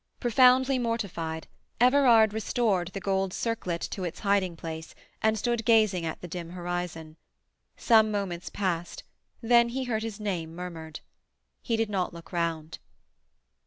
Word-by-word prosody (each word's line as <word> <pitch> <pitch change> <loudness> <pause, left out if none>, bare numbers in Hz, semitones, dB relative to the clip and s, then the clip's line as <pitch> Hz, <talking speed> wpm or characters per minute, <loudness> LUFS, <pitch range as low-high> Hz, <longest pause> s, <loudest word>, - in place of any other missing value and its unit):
Profoundly 255 +2 +4
mortified, 190 -9 -3 0.3
Everard 245 -4 +5
restored 215 -4 0
the 190 +2 -6
gold 190 -1 -1
circlet 185 -8 -2
to 190 - -4
its 175 -2 -5
hiding 195 -4 +1
place 160 -1 -7 0.3
and 220 0 +2
stood 235 +1 -1
gazing 215 -7 +3
at 160 - -5
the 180 - -7
dim 170 -1 -6
horizon. 175 -3 -5 0.6
Some 220 -2 +5
moments 195 -4 -3
passed, 175 -4 -3 0.4
then 235 0 +5
he 260 +2 -3
heard 230 -3 -1
his 220 -2 -5
name 175 -6 -3
murmured. 165 -3 -7 0.6
He 230 -2 -1
did 225 -1 -1
not 185 -3 -1
look 170 - -12
round. 165 -2 -2
195 Hz, 140 wpm, -28 LUFS, 170-225 Hz, 0.6 s, Everard